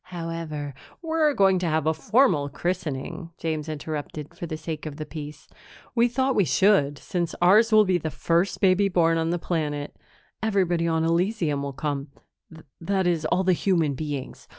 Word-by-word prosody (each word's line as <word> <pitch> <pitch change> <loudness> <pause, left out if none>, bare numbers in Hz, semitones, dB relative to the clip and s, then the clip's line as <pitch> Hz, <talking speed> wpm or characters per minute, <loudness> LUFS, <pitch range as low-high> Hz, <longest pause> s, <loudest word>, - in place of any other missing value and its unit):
"However 165 -5 -5
" - - -26
"We're 320 -3 +1
going 195 -2 +4
to 180 - -1
have 160 -1 0
a 160 - +3
formal 190 - +2
christening," 170 0 -4
James 155 -1 -3
interrupted, 150 0 -5
for 170 - -7
the 155 - -4
sake 155 -1 -5
of 150 - -6
the 155 0 -6
peace. 150 -1 -9 0.5
"We 235 0 +4
thought 260 +2 0
we 205 - +3
should, 145 -1 +3
since 175 0 -3
ours 210 +6 +5
will 215 -1 +6
be 185 -2 +2
the 160 - -3
first 170 +6 0
baby 195 +1 +4
born 165 -2 +2
on 165 0 0
the 175 - 0
planet. 150 -4 -3 0.5
Everybody 185 -6 +1
on 160 -1 +1
Elysium 170 -3 0
will 140 -1 -4
come 140 0 -3 0.7
that 190 +2 0
is, 170 -3 +1
all 180 +4 +1
the 185 0 +3
human 170 -5 +1
beings. 145 -1 -6
165 Hz, 175 wpm, -25 LUFS, 150-190 Hz, 0.7 s, will